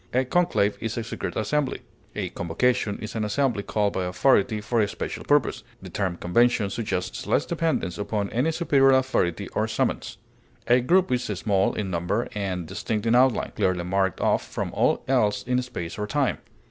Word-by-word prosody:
A 130 +1 +3
conclave 125 -10 +1
is 115 0 -3
a 115 - -1
secret - - -5
assembly. 135 +5 -1 0.3
A - - -2
convocation 105 +4 0
is 110 - -7
an 110 - -2
assembly 115 0 0
called 105 0 0
by 95 - -1
authority 105 +2 +2
for 110 +2 0
a 105 - +2
special - - -5
purpose; - - +2 0.2
the - - -10
term 95 -4 -2
convention 110 +2 +2
suggests 105 -5 -3
less - - +2
dependence 160 - -1
upon 105 -1 -2
any 125 +8 +1
superior 135 -5 +4
authority 130 -10 0
or - - -1
summons. - - -2 0.5
A 125 +1 +4
group 180 +5 +3
is 125 0 0
small 100 -1 0
in 100 -3 -3
number 90 +7 -1
and 95 -4 -3
distinct 105 +4 -3
in 115 - +3
outline, 125 0 +3
clearly 90 -2 +1
marked 95 +1 0
off - - +2
from - - -4
all - - +1
else 105 -1 +2
in 125 0 0
space 105 -7 -6
or 105 - -2
time. 135 +5 0
110 Hz, 180 wpm, -25 LUFS, 95-125 Hz, 0.5 s, superior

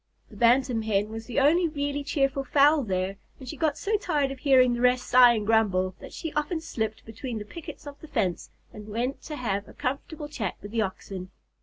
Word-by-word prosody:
The - - -13
Bantam 245 0 +3
Hen 210 -1 0
was 225 0 -7
the 250 - 0
only 330 +6 +4
really 285 -2 -2
cheerful 275 -1 0
fowl 290 +3 +4
there, 190 -3 -2 0.2
and 260 - -10
she 280 - -5
got 305 -1 0
so 425 +1 0
tired 295 -8 0
of 270 - -7
hearing 255 -3 +5
the 240 - -2
rest 250 0 +3
sigh 245 -1 +7
and 210 -2 -2
grumble, 195 -4 +2
that - - -10
she 325 -3 -6
often 300 +3 -1
slipped 220 -8 -4
between 230 +2 -6
the 210 - -6
pickets 315 +5 -10
of 285 0 -10
the 315 - -10
fence 205 - -1 0.2
and 210 0 -10
went 245 +6 -2
to 305 - -7
have 205 -7 -2
a - - -13
comfortable 290 +2 -4
chat 235 -10 -4
with 205 - -10
the 230 -1 0
Oxen. 190 -2 -5
250 Hz, 215 wpm, -27 LUFS, 220-290 Hz, 0.2 s, sigh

